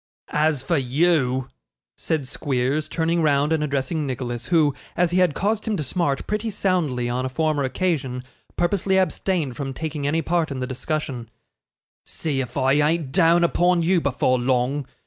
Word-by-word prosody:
'As 150 -3 +1
for 165 +4 +1
you,' 130 -1 +1 0.5
said 150 -5 -2
Squeers, 140 +2 -1
turning 165 0 0
round 145 0 +2
and 155 -1 +1
addressing 140 +1 -1
Nicholas, 120 -2 -4
who, 155 -5 +3 0.2
as 175 -1 +2
he 180 - +2
had 180 -5 +3
caused 215 +2 -1
him 215 -2 0
to 155 - -2
smart 140 -1 -1
pretty 210 +2 -2
soundly 175 - 0
on 125 +1 -1
a 130 - -2
former 155 +1 0
occasion, 130 -3 -1 0.3
purposely 190 +2 +1
abstained 180 -6 0
from 135 -2 -5
taking 150 -2 -3
any 160 +3 0
part 170 -2 0
in 135 -2 -4
the 130 - -2
discussion, 130 -2 -4 0.7
'see 145 -4 -2
if 125 - -6
I 135 +1 +3
ain't 150 0 +1
down 170 +1 +4
upon 175 0 +2
you 175 +1 +3
before 130 -2 +1
long. 130 +2 0
150 Hz, 165 wpm, -23 LUFS, 130-170 Hz, 0.7 s, down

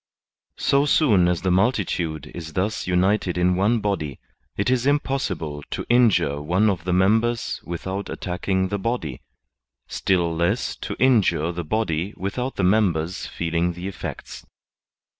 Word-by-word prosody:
So 140 +1 +2
soon 105 - +4
as 90 0 0
the 95 - +1
multitude 90 -7 0
is 80 -2 -7
thus 95 +4 -1
united 90 0 +1
in 90 +1 +3
one 105 +5 +2
body, 85 -10 -2 0.4
it 100 +5 +1
is 130 0 +1
impossible 110 - -1
to - - -4
injure 95 - +3
one 90 +8 +2
of 85 -4 -5
the 90 - -1
members 110 +6 +1
without 95 +3 -5
attacking 95 +1 -2
the 100 - -2
body, 95 - -3 0.7
still 85 -3 0
less 85 +1 0
to - - -5
injure 110 -10 +3
the 85 0 -4
body 90 0 -1
without 125 +7 -3
the 100 - -1
members 90 -3 +1
feeling 85 +1 -1
the 90 +2 -6
effects. 100 - -7
95 Hz, 140 wpm, -23 LUFS, 85-110 Hz, 0.7 s, soon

